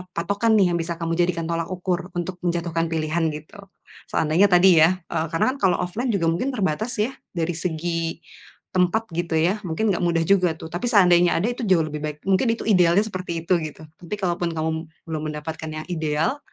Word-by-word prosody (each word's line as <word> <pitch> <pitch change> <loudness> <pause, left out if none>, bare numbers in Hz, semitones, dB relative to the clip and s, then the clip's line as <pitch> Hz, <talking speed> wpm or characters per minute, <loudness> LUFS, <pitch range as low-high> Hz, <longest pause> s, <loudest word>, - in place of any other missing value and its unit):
patokan 200 +6 +1
nih 180 -3 +3
yang - - +1
bisa 170 +1 -4
kamu 165 0 -2
jadikan 170 -2 +1
tolak 165 0 -1
ukur 180 0 -2
untuk 175 +1 -3
menjatuhkan 170 -1 0
pilihan, 160 +1 0
gitu. 155 +7 -10 0.5
Seandainya 165 +6 +3
tadi 180 0 +6
ya, 185 +3 +4
eee, 160 0 -2
karena 255 +10 +2
kan - - -10
kalau - - +1
offline 225 +8 -3
juga 170 -5 +1
mungkin 250 +11 -1
terbatas 215 +2 -1
ya, 240 +5 -1 0.2
dari 170 0 -1
segi 165 0 -2 0.5
tempat 185 +5 +2
gitu 170 -1 -2
ya 180 +7 +2
mungkin 200 +6 0
nggak 175 - -2
mudah 170 -1 +2
juga 180 -4 +3
tuh. 160 - -9
Tapi 175 +7 -3
seandainya 180 -6 +5
ada 200 - 0
itu 245 +1 -5
jauh 180 -4 +4
lebih 150 -1 -5
baik. 150 -1 -4
Mungkin 195 +6 +3
itu - - -7
idealnya 180 -1 +4
seperti 185 -5 -5
itu 185 - +3
gitu. 155 0 -7 0.2
Tapi 180 +3 -5
kalaupun 175 -3 -1
kamu 160 0 -1 0.4
belum 155 -2 -3
mendapatkan 160 +1 -6
yang 155 0 -5
ideal, 160 - -1
175 Hz, 195 wpm, -23 LUFS, 165-190 Hz, 0.5 s, tadi